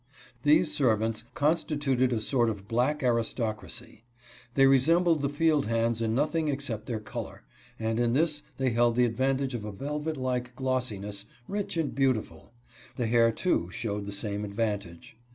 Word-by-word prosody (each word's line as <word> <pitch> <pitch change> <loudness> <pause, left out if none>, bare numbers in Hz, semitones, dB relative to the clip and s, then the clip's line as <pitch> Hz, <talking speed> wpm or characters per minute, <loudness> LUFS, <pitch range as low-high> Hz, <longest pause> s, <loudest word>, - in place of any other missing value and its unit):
These 150 +2 +4
servants 110 -5 +1
constituted 145 -4 +1
a 115 - +1
sort 120 +1 +2
of 100 -2 -6
black 130 +6 +1
aristocracy. 115 -1 -2 0.5
They 135 - +6
resembled 160 +5 +4
the 140 - 0
field 150 -2 +2
hands 115 0 +1
in 110 0 0
nothing 155 +3 +1
except 135 -7 -2
their 115 -3 -2
color, 110 +2 -7 0.4
and 110 0 -1
in 120 -1 +2
this 150 +1 +1 0.2
they 130 -2 +1
held 120 0 +3
the 125 0 +4
advantage 130 +3 0
of 120 -3 -4
a 105 - -5
velvet 150 +8 -3
like 125 -1 -2
glossiness, 105 -7 -2 0.2
rich 200 -3 -3
and 160 -4 -1
beautiful. 120 - -1 0.4
The 120 - -1
hair, 115 0 +4
too, 110 - 0
showed 105 0 -4
the - - -4
same 100 0 -3
advantage. 100 -3 -4
120 Hz, 155 wpm, -28 LUFS, 110-140 Hz, 0.5 s, They